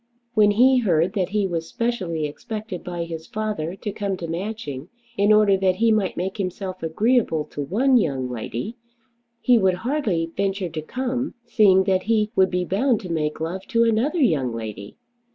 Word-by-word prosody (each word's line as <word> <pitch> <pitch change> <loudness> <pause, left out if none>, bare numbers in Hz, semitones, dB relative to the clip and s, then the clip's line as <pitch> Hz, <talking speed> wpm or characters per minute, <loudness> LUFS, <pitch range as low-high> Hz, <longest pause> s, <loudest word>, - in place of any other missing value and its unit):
When 210 -3 +5
he 250 +5 +5
heard 180 -4 +2
that 190 -4 0
he 205 0 0
was 165 -3 -3
specially 185 -10 -2
expected 210 +5 -6
by 175 -1 -4
his 165 -1 -7
father 210 -6 -3
to 205 +1 -5
come 200 -2 -3
to 170 - -5
Matching 170 - -5 0.3
in 205 0 +3
order 210 -2 +5
that 190 -1 +2
he 225 +3 +3
might 210 -4 0
make 190 +3 -3
himself 185 -1 -4
agreeable 165 -1 +1
to 145 - -4
one 245 - +3
young 135 - 0
lady, 125 - -5 0.6
he 245 -2 +5
would 190 -2 +3
hardly 205 - 0
venture 195 -2 -1
to 155 -1 -5
come, 255 - -3
seeing 205 -5 +5
that 190 -1 +1
he 215 0 +1
would 190 -2 +4
be 180 0 -1
bound 220 +5 +1
to 180 -4 -6
make 155 -2 -1
love 175 +4 -4
to 230 -2 +3
another 230 +9 +1
young 155 - +2
lady! 110 -3 -7
190 Hz, 180 wpm, -23 LUFS, 165-220 Hz, 0.6 s, When